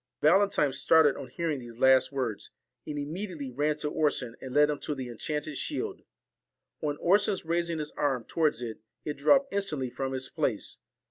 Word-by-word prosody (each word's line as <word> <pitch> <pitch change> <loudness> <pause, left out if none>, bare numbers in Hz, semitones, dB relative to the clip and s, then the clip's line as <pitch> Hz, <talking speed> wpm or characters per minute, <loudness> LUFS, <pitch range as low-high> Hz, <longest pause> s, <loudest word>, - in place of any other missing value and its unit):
Valentine 155 -3 +4
started 140 +2 +5
on 130 - -7
hearing 155 +2 -2
these 120 -2 -10
last 130 +1 +5
words, 125 -6 -3 0.4
and 150 -1 -4
immediately 155 -1 -4
ran 150 +4 0
to 150 - -3
Orson, 145 -6 0
and 130 - -7
led 150 +2 +4
him 145 - -3
to 150 - -3
the 130 -2 -5
enchanted 150 +5 -4
shield. 390 +6 -3 0.8
On 145 -1 -1
Orson's 200 +2 +2
raising 170 0 0
his 150 -1 -4
arm 135 -5 0
towards 150 -3 0
it, 115 -2 -5 0.3
it 150 -1 -3
dropped 275 - +4
instantly 155 -11 -1
from 135 +1 -3
its 130 0 -3
place. - - -2
150 Hz, 175 wpm, -29 LUFS, 130-165 Hz, 0.8 s, started